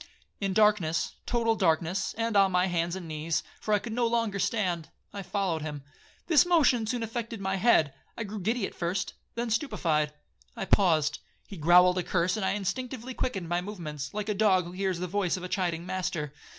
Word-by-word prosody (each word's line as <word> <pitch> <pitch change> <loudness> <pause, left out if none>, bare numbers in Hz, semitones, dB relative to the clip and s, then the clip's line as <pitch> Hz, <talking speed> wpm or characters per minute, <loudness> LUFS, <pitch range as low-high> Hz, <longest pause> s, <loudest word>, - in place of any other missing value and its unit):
'In 195 -1 -1
darkness, 205 -6 +2
total 230 -2 +2
darkness, 170 0 +1
and 230 -1 -1
on 195 -1 +5
my 180 0 +3
hands 175 -1 -1
and 185 -3 -7
knees, 155 +1 -2 0.2
for 215 - -4
I 210 - +5
could 225 +2 -6
no 240 0 +1
longer 230 -4 0
stand, 180 -7 -1 0.2
I 200 - -5
followed 190 -4 -1
him. 150 -2 -5 0.4
This 320 -4 +6
motion 300 -10 +3
soon 240 0 -1
affected 230 0 -4
my 190 0 -1
head; 180 - +4 0.2
I 230 - -2
grew 210 0 -6
giddy 220 +2 0
first, 180 +3 -2 0.2
then 235 0 -2
stupified. 160 - 0 0.4
I - - -4
paused. 155 -6 +3 0.3
He 200 - -8
growled 180 +2 +5
a - - -1
curse, 180 +2 +1
and 215 - -3
I 190 - +1
instinctively 250 +5 -4
quickened 195 -9 -3
my 175 +1 0
movements, 155 -8 -6
like 210 0 -4
a 210 - +1
dog 195 -3 +3
who 175 - -8
hears 190 -1 -1
the 180 - -3
voice 190 0 0
of 180 - -8
a - - -3
chiding 175 -3 -1
master. 170 -6 -3
190 Hz, 195 wpm, -28 LUFS, 170-220 Hz, 0.4 s, This